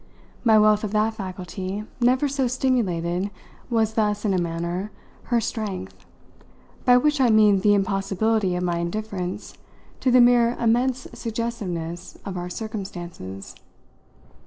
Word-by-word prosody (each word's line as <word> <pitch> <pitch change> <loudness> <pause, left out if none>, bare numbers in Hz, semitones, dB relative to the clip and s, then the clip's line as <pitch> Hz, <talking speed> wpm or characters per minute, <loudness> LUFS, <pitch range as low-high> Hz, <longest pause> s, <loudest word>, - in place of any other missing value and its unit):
My 220 -2 +6
wealth 215 0 +4
of 210 -1 -3
that 215 +1 +2
faculty, 190 0 -5 0.2
never 255 +4 +3
so 270 -2 0
stimulated, 200 -8 0 0.4
was 220 -2 +1
thus, 210 -1 0
in 200 - +2
a 185 - +2
manner, 170 +4 -3 0.3
her 240 - +2
strength; 185 - -5 0.8
by 245 0 +7
which 295 +2 +2
I 250 - +5
mean 210 -3 +5
the 205 +2 +4
impossibility 195 0 0
of 180 - -2
my 175 -1 0
indifference 185 0 -4 0.5
to 260 - +1
the 250 0 +6
mere 240 0 +5
immense 245 +3 +1
suggestiveness 185 -8 -4
of 195 -2 -5
our 175 0 -4
circumstances. 175 - -7
210 Hz, 135 wpm, -24 LUFS, 180-235 Hz, 0.8 s, by